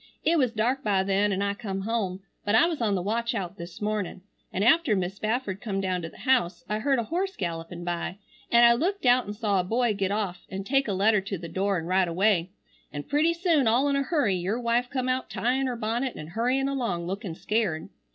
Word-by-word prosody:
It 330 Hz, +1 st, +4 dB
was 255 Hz, -4 st, +2 dB
dark 245 Hz, +5 st, 0 dB
by 195 Hz, -3 st, +2 dB
then 200 Hz, +1 st, +2 dB
an 195 Hz, +1 st, 0 dB
I 200 Hz, 0 st, 0 dB
come 200 Hz, -3 st, -4 dB
home, 195 Hz, -3 st, -2 dB, 0.2 s
but 205 Hz, +1 st, +2 dB
I 280 Hz, -, +6 dB
was 330 Hz, -6 st, -2 dB
on 210 Hz, -3 st, +2 dB
the 180 Hz, -, -1 dB
watchout 210 Hz, -3 st, -2 dB
this 170 Hz, 0 st, -9 dB
morning, 210 Hz, -4 st, -2 dB, 0.3 s
and 190 Hz, -, -1 dB
after 290 Hz, -1 st, +4 dB
Mis' 190 Hz, 0 st, -2 dB
Spafford 215 Hz, -3 st, -2 dB
come 200 Hz, -4 st, -2 dB
down 185 Hz, -2 st, -1 dB
to 165 Hz, -, -5 dB
the -, -, -17 dB
house 250 Hz, -9 st, +1 dB
I 210 Hz, 0 st, -1 dB
heard 270 Hz, +4 st, +2 dB
a 235 Hz, -, 0 dB
horse 370 Hz, -, -2 dB
gallopin 170 Hz, 0 st, -4 dB
by 175 Hz, +1 st, -3 dB, 0.3 s
an 235 Hz, 0 st, +6 dB
I 235 Hz, 0 st, +8 dB
looked 355 Hz, +8 st, -1 dB
out 245 Hz, -1 st, +4 dB
an 205 Hz, -, -4 dB
saw 205 Hz, -3 st, +1 dB
a -, -, +1 dB
boy 230 Hz, +4 st, +1 dB
get 195 Hz, -2 st, -1 dB
off 200 Hz, -3 st, -3 dB
an 195 Hz, +1 st, -4 dB
take 275 Hz, +5 st, +1 dB
a 200 Hz, -, 0 dB
letter 205 Hz, +2 st, +3 dB
to 195 Hz, 0 st, -4 dB
the 170 Hz, -, -7 dB
door 190 Hz, +3 st, 0 dB
an 165 Hz, -, -4 dB
ride 185 Hz, +1 st, +2 dB
away, 180 Hz, 0 st, +2 dB, 0.4 s
an 145 Hz, -1 st, -5 dB
pretty 310 Hz, -, +2 dB
soon 335 Hz, -7 st, +2 dB
all 245 Hz, +6 st, +3 dB
in 280 Hz, -, +1 dB
a 275 Hz, -, +2 dB
hurry 275 Hz, -, +1 dB
your 185 Hz, +6 st, -1 dB
wife 240 Hz, +1 st, +1 dB
come 255 Hz, -2 st, -2 dB
out 255 Hz, 0 st, -1 dB
tyin 260 Hz, +3 st, 0 dB
her 250 Hz, -, -2 dB
bonnet 235 Hz, +3 st, -2 dB
and 155 Hz, -, -8 dB
hurryin 250 Hz, +7 st, +1 dB
along 235 Hz, -11 st, -2 dB
lookin 190 Hz, -1 st, -4 dB
scared. 210 Hz, -6 st, -1 dB
215 Hz, 235 wpm, -27 LUFS, 190-250 Hz, 0.4 s, I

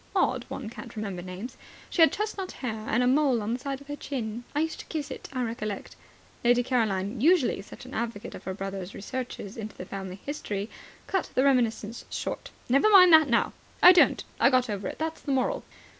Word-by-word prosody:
Odd -, -, +2 dB
one 260 Hz, -, -5 dB
can't 235 Hz, +2 st, -9 dB
remember 200 Hz, -5 st, -4 dB
names. 185 Hz, +8 st, -7 dB, 0.3 s
She 345 Hz, -, +2 dB
had 325 Hz, -, +8 dB
chestnut 415 Hz, -3 st, -3 dB
hair 220 Hz, -4 st, -5 dB
and 240 Hz, +3 st, +2 dB
a -, -, +3 dB
mole 265 Hz, -2 st, +3 dB
on 220 Hz, +3 st, -1 dB
the 245 Hz, -, -2 dB
side 275 Hz, +1 st, -4 dB
of 280 Hz, -, -15 dB
her 290 Hz, -, -4 dB
chin. 240 Hz, -5 st, -5 dB
I 295 Hz, -, +2 dB
used 320 Hz, 0 st, -2 dB
to -, -, -9 dB
kiss 300 Hz, -3 st, -4 dB
it, -, -, -7 dB
I 255 Hz, -2 st, -1 dB
recollect 215 Hz, -3 st, -4 dB, 0.2 s
" -, -, -29 dB
Lady 245 Hz, +1 st, +4 dB
Caroline, 220 Hz, -3 st, 0 dB
usually 310 Hz, -, +4 dB
such 205 Hz, -, -12 dB
an 255 Hz, -, -10 dB
advocate 225 Hz, -2 st, -4 dB
of -, -, -10 dB
her 190 Hz, -, -3 dB
brother's 195 Hz, -1 st, -5 dB
researches 235 Hz, -2 st, -6 dB
into 215 Hz, -1 st, -7 dB
the 180 Hz, -, -6 dB
family 190 Hz, 0 st, -6 dB
history, 210 Hz, -8 st, -4 dB, 0.3 s
cut 380 Hz, -2 st, -1 dB
the 260 Hz, -, +4 dB
reminiscences 235 Hz, -4 st, +1 dB
short. -, -, -4 dB, 0.2 s
"Never 275 Hz, -, +4 dB
mind 365 Hz, -4 st, +8 dB
that 315 Hz, -3 st, +8 dB
now." 235 Hz, -, +2 dB, 0.3 s
"I 360 Hz, -, +12 dB
don't. 360 Hz, -2 st, +5 dB, 0.2 s
I -, -, +6 dB
got 255 Hz, -3 st, +2 dB
over 200 Hz, -2 st, -3 dB
it. -, -, -5 dB
That's 320 Hz, 0 st, -3 dB
the 280 Hz, -, -1 dB
moral." -, -, 0 dB
245 Hz, 215 wpm, -27 LUFS, 210-280 Hz, 0.3 s, I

